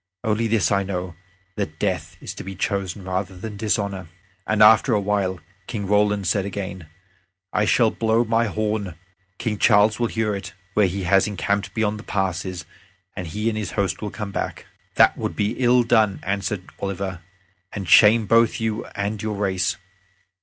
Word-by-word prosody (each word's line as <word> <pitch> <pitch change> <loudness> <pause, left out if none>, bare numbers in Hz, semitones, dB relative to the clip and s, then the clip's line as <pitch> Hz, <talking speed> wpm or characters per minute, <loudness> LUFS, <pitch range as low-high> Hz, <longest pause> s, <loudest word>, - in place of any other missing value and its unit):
"Only 110 0 +1
this 110 -4 +2
I 100 -1 +3
know 90 -2 -4 0.4
that 80 -7 -3
death - - -2
is - - -7
to - - -8
be 95 0 -7
chosen 100 0 -2
rather 95 0 -3
than 105 +3 -7
dishonor." 100 -3 -1 0.4
After 110 +3 +6
a - - +2
while 100 -2 -1 0.3
Roland 105 -1 +1
said 100 +3 +1
again, 95 -3 -6 0.7
"I 105 0 +2
shall 115 0 +3
blow 115 +1 +1
my 115 0 +1
horn; 105 -3 -2 0.4
King 105 -3 -3
Charles 105 +3 +4
will 120 - +2
hear 110 -2 -1
it, 100 +1 -7 0.2
where 105 -1 +4
he 95 +2 -3
has 95 +3 +3
encamped 100 0 -2
beyond 105 -1 0
the - - -10
passes, 95 -3 -2 0.5
and 90 -3 -5
he 105 +7 -3
and 115 - 0
his 105 -4 -4
host 100 -3 -1
will 105 - -3
come 105 -1 -6
back." - - -4 0.3
"That - - +5
would - - -3
be 105 0 0
ill 125 -1 +4
done," 110 -4 +3
answered 100 0 -2 0.2
Oliver, 95 -2 -4 0.5
"and 100 -3 -6
shame 110 +5 +7
both 115 +1 +3
you 110 -1 -2
and 100 +1 -2
your 110 -1 -2
race. 95 -3 0
105 Hz, 170 wpm, -23 LUFS, 95-110 Hz, 0.7 s, shame